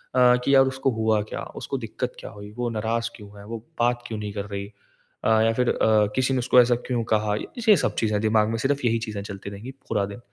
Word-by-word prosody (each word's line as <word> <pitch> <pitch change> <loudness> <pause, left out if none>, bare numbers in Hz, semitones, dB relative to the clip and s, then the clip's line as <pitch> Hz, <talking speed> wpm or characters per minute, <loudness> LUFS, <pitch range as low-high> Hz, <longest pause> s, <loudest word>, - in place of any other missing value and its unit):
अ, 125 -1 +6
कि 140 - +3
यार 135 0 +7
उसको 135 0 0
हुआ 110 -1 +1
क्या? 105 - -6 0.2
उसको - - -3
दिक्कत - - -4
क्या - - -8
हुई? 105 0 -10
वो 120 -1 -1
नाराज 115 +1 -1
क्यों 105 -3 -12
है? 100 - -11
वो 115 +2 -5 0.2
बात 120 0 +1
क्यों 110 - -5
नहीं 105 -1 -4
कर 100 -1 -4
रही? 100 -1 -5 0.6
अ, - - +2
या 115 0 +3
फिर 125 +1 +1
अ, 110 -1 +3
किसी 130 +1 +1
ने 130 - +1
उसको 125 +1 +4
ऐसा 120 0 +3
क्यों 120 -2 0
कहा? 105 -1 +1 0.3
ये 210 - +9
सब - - -1
चीज़ें 105 -2 +1
दिमाग 110 0 +3
में 115 - -1
सिर्फ़ 140 +1 0
यही 115 -1 +2
चीज़ें 105 -3 -5
चलती 100 -1 -7
रहेंगी 105 +6 -8 0.2
पूरा 105 -3 +1
दिन। 100 +3 -9
110 Hz, 245 wpm, -24 LUFS, 105-125 Hz, 0.6 s, ये